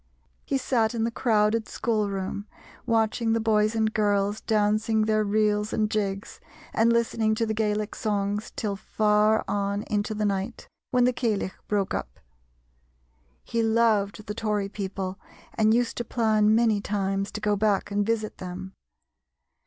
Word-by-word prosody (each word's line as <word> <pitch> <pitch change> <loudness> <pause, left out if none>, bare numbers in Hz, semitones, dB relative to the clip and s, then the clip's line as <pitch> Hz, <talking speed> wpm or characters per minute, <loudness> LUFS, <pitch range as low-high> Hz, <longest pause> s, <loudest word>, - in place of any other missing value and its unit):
He 275 - 0
sat 240 -3 +1
in 225 - 0
the 230 - 0
crowded 220 -1 +1
schoolroom, 205 -3 -2 0.4
watching 225 0 +1
the 230 - +2
boys 215 0 +2
and 220 -1 +1
girls 205 0 +1
dancing 215 0 +1
their 215 0 +2
reels 210 0 +1
and 215 -1 0
jigs, 200 0 -2 0.3
and 230 +1 +3
listening 225 -2 +1
to 230 - 0
the 220 - -1
Gaelic 210 -1 -1
songs 205 -1 -2
till 205 -2 -2
far 210 +1 +2
on 200 0 -1
into 210 +1 -2
the 210 0 -1
night, 200 +3 -2 0.2
when 250 -1 +3
the 250 +1 +3
Ceilidh 215 -6 -1
broke 200 -2 0
up. - - -5 1.2
He 230 - -1
loved 220 -2 +2
the 210 - -4
Tory 210 -2 -1
people 195 -1 -4 0.3
and 220 0 +3
used 235 +1 +1
to 240 - -1
plan 215 -2 +2
many 225 -3 +3
times 195 -1 -1
to 210 - -4
go 210 0 +1
back 205 0 +1
and 205 0 +1
visit 220 0 -2
them. 185 +1 -7
215 Hz, 155 wpm, -26 LUFS, 205-225 Hz, 1.2 s, and